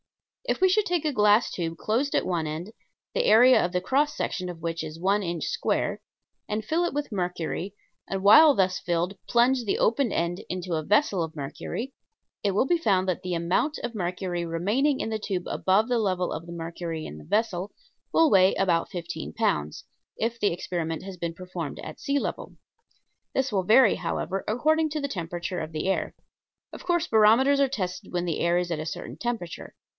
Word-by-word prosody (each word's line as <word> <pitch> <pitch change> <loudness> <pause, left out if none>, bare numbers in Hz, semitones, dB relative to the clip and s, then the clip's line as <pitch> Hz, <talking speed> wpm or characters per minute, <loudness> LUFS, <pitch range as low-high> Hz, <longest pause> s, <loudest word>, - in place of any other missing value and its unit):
If - - -1
we 375 - +5
should 405 +3 +2
take 345 -3 0
a 300 - +1
glass 210 0 +4
tube 165 -2 -3
closed 245 - 0
at - - +2
one 170 -3 -1
end, 165 +8 -5 0.4
the - - +1
area 250 +4 +6
of 175 - -1
the 180 - 0
cross 285 +10 +1
section 180 -1 -2
of 175 -2 -7
which 165 0 -3
is 160 +1 -7
one 200 +4 +2
inch 170 -3 -3
square, - - -1 0.5
and 215 +1 -2
fill 325 +8 +1
it 345 - -1
with 290 -2 -3
mercury, 180 0 -3 0.3
and 195 0 -3
while 290 +8 +8
thus 185 -1 +1
filled 175 +2 -1
plunge 245 +1 +3
the 205 - 0
open 235 0 +2
end 170 +1 -1
into 180 -1 -4
a 155 -1 -1
vessel 205 - +2
of 160 -1 -6
mercury, 160 - -5 0.5
it 200 - +2
will 205 +6 +2
be 345 +4 +2
found 190 - +2
that 185 -1 -1
the 180 -1 -3
amount 175 - 0
of 240 - -3
mercury 180 -2 -3
remaining 210 - 0
in - - -2
the 220 - -2
tube 190 -4 -3
above 195 +4 +2
the 245 -2 +1
level 185 -4 0
of 165 +2 -6
the - - -8
mercury 165 -1 -5
in 75 - -8
the - - -12
vessel 205 -1 -1 0.4
will 325 -1 +5
weigh 190 -1 +5
about 175 -3 +1
fifteen 175 -2 -6
pounds, 75 +1 -1 0.3
if 230 +1 -2
the 205 - +2
experiment 170 -2 -3
has 195 -1 -7
been 170 -1 -4
performed 180 -4 -6
at 155 - -9
sea 280 0 0
level. - - -5 0.8
This 265 -1 +1
will 195 -3 +1
vary, 220 +4 +6
however, 195 +1 -3
according 310 +8 +2
to 305 +1 -3
the 280 - -2
temperature 175 -4 -4
of 155 0 -5
the 155 +3 -3
air. 190 - -1 0.6
Of - - -9
course 345 -1 +1
barometers 230 +6 +5
are 275 -1 +3
tested 185 -8 -4
when 175 0 -1
the 165 -3 -2
air 170 +1 +2
is 175 -1 -1
at 160 - -1
a 155 - -4
certain - - -6
temperature. 230 -8 -5
190 Hz, 200 wpm, -26 LUFS, 170-240 Hz, 0.8 s, while